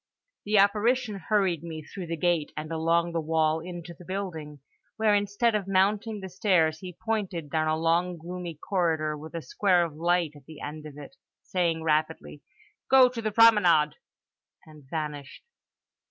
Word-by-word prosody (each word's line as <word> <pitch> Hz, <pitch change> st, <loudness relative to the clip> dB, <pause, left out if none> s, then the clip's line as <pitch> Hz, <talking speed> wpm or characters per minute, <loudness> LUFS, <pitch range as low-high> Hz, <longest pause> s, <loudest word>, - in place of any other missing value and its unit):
The 210 Hz, +1 st, +2 dB
apparition 210 Hz, +2 st, +2 dB
hurried 190 Hz, -7 st, +2 dB
me 160 Hz, -2 st, -7 dB
through 180 Hz, +3 st, -8 dB
the 165 Hz, 0 st, -3 dB
gate, 170 Hz, -2 st, 0 dB
and 155 Hz, +1 st, -5 dB
along 165 Hz, +1 st, +1 dB
the 165 Hz, -1 st, -1 dB
wall 160 Hz, 0 st, +1 dB
into 175 Hz, 0 st, -8 dB
the 175 Hz, -, -15 dB
building, 165 Hz, -6 st, -5 dB, 0.4 s
where 220 Hz, -1 st, +3 dB
instead 205 Hz, +3 st, +1 dB
of 205 Hz, -3 st, -1 dB
mounting 200 Hz, +3 st, +1 dB
the 190 Hz, -, -6 dB
stairs 175 Hz, -4 st, +1 dB
he 180 Hz, -1 st, -9 dB
pointed 190 Hz, -9 st, -2 dB
down 155 Hz, -1 st, +1 dB
a 155 Hz, 0 st, +1 dB
long, 170 Hz, +2 st, +1 dB
gloomy 175 Hz, 0 st, -7 dB
corridor 160 Hz, -3 st, -1 dB
with 155 Hz, +3 st, -10 dB
a 165 Hz, -, -4 dB
square 180 Hz, -4 st, +2 dB
of 165 Hz, -, -7 dB
light 170 Hz, 0 st, +1 dB
at 145 Hz, -, -16 dB
the 155 Hz, -2 st, -11 dB
end 155 Hz, +1 st, -7 dB
of 145 Hz, -1 st, -12 dB
it, 150 Hz, -, -11 dB, 0.3 s
saying 170 Hz, -3 st, -1 dB
rapidly, 155 Hz, -1 st, -1 dB, 0.5 s
"Go 260 Hz, -1 st, +7 dB
to 240 Hz, -2 st, -6 dB
the 215 Hz, -1 st, -2 dB
promenade"—and 170 Hz, -, +1 dB
vanished. 150 Hz, -3 st, -5 dB
170 Hz, 165 wpm, -27 LUFS, 155-200 Hz, 0.5 s, Go